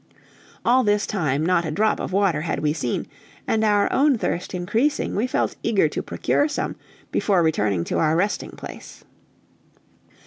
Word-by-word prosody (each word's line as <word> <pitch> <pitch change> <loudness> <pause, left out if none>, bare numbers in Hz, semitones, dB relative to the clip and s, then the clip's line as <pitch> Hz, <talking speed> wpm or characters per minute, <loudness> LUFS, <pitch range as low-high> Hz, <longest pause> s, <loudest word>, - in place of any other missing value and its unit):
All 255 +2 +4
this 205 -1 +2
time 155 -7 -1
not 175 -1 +2
a 160 - -3
drop 215 +8 +1
of - - -4
water 190 -5 +2
had 165 - -2
we 150 -1 +1
seen, 135 -7 -2 0.4
and 220 0 +1
our 205 -1 +3
own 280 -1 +4
thirst 185 -3 -3
increasing, 220 +11 0
we 220 +5 +1
felt - - -1
eager - - +2
to - - -3
procure 290 - 0
some 295 - -3 0.4
before 190 -5 +2
returning 105 - +1
to - - -2
our 155 0 +2
resting 200 +5 0
place. - - -11
190 Hz, 165 wpm, -23 LUFS, 160-220 Hz, 0.4 s, All